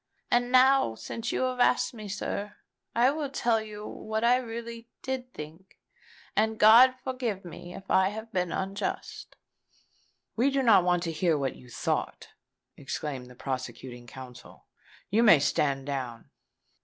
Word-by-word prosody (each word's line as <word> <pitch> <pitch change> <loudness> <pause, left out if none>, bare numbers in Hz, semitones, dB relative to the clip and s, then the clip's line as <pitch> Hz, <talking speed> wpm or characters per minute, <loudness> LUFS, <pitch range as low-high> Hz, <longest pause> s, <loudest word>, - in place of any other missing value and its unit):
And 245 0 +2
now, 260 - +5
since 230 - -5
you - - 0
have 255 -1 -1
asked 245 - +3
me, 215 -3 -8
sir, 205 +1 -4 0.4
I 245 +3 +4
will 295 -1 -3
tell 235 -4 +1
you 210 -1 -8
what 220 +1 -4
I 245 +1 +5
really 235 -1 -7
did 260 -1 -4
think; 160 +3 -11 0.6
and 220 +1 +1
God 240 +5 +8
forgive 245 -7 -3
me 175 +1 -9
if - - -9
I 190 0 +3
have 220 +2 -8
been 180 -2 0
unjust." 195 +1 -4 1.0
"We 245 +5 +3
do 275 -1 0
not 220 -7 +6
want 175 -1 +2
to 165 - -2
hear 165 0 +1
what 135 -2 -2
you 125 - -15
thought," - - -3 0.5
exclaimed 135 -2 -5
the 125 - -14
prosecuting 130 -2 -6
counsel. 125 0 -12 0.5
"You 220 +3 +4
may 215 -8 +8
stand 140 -1 0
down." 130 -5 -5
210 Hz, 155 wpm, -28 LUFS, 150-240 Hz, 1.0 s, God